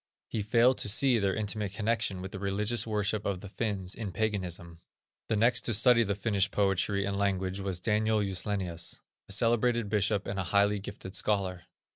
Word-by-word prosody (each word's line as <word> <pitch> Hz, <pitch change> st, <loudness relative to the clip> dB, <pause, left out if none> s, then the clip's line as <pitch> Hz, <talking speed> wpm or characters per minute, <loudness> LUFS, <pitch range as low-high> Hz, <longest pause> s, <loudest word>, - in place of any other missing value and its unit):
He 110 Hz, -, -2 dB
failed 120 Hz, +4 st, +3 dB
to -, -, +2 dB
see 120 Hz, +2 st, +4 dB
their 100 Hz, -2 st, +1 dB
intimate 105 Hz, -2 st, -2 dB
connection 110 Hz, -3 st, -1 dB
with 95 Hz, -, -6 dB
the 95 Hz, -, -6 dB
religious 105 Hz, +4 st, 0 dB
worship 105 Hz, -1 st, -1 dB
of 95 Hz, -2 st, -2 dB
the 100 Hz, -, -9 dB
Finns 100 Hz, -4 st, -2 dB
in 105 Hz, -4 st, -5 dB
paganism. 90 Hz, -5 st, -3 dB, 0.5 s
The -, -, +2 dB
next 115 Hz, +3 st, +3 dB
to 120 Hz, -, +2 dB
study 120 Hz, +2 st, +6 dB
the 100 Hz, -3 st, 0 dB
Finnish 100 Hz, -1 st, 0 dB
poetry 100 Hz, 0 st, +1 dB
and 100 Hz, 0 st, -2 dB
language 95 Hz, -1 st, 0 dB
was 95 Hz, -2 st, -3 dB
Daniel 110 Hz, +2 st, +1 dB
Juslenius, 95 Hz, -3 st, -3 dB, 0.3 s
a -, -, -7 dB
celebrated 115 Hz, +1 st, +2 dB
bishop, 105 Hz, -1 st, +1 dB
and 100 Hz, 0 st, -3 dB
a 95 Hz, -, -2 dB
highly 100 Hz, +1 st, +3 dB
gifted 95 Hz, -1 st, -8 dB
scholar. 95 Hz, -4 st, -1 dB
100 Hz, 180 wpm, -30 LUFS, 95-110 Hz, 0.5 s, study